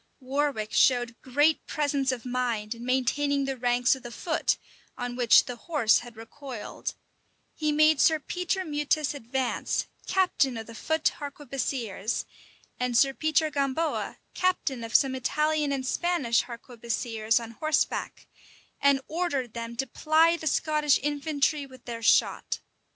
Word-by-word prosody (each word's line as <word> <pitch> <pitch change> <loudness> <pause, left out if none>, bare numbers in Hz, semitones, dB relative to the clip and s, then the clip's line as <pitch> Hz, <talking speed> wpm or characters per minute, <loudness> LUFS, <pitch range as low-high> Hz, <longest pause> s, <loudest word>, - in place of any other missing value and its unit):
Warwick 270 -5 -1
showed 245 -2 +3
great 290 +5 +2
presence 280 -3 0
of 250 -2 -5
mind 240 -4 -1
in 235 0 -10
maintaining 275 +3 +1
the 270 0 -2
ranks 245 +1 +2
of 265 - -11
the 240 - -8
foot, 315 +6 0 0.4
on 245 0 -4
which 240 -3 +6
the 245 - -5
horse 265 -6 +2
had 240 -2 -12
recoiled: 240 0 -7 0.6
he 305 -1 -1
made 310 -1 +4
Sir 315 - +5
Peter 360 +4 -2
Meutas 295 -1 0
advance, 260 -1 -2 0.2
captain 355 -9 +2
of 225 - -6
the 230 - -11
foot 315 +7 0
harquebusiers, 270 -7 -3 0.5
and 250 -1 +1
Sir 270 +2 +4
Peter 310 +1 +1
Gamboa, 280 +3 -1 0.2
captain 305 -9 0
of 225 -1 -6
some 270 -1 +5
Italian 300 +3 0
and 270 -2 -2
Spanish 280 -7 +1
harquebusiers 235 -2 -2
on 230 -1 -8
horseback; 310 +6 -1 0.6
and 280 -1 +4
ordered 295 -8 -2
them 235 0 -5
to 270 +3 -1
ply 315 +6 +3
the 320 -2 -5
Scottish 300 -1 +2
infantry 290 0 0
with 260 -2 -16
their 235 -1 -5
shot. 225 - +2
270 Hz, 140 wpm, -27 LUFS, 240-300 Hz, 0.6 s, which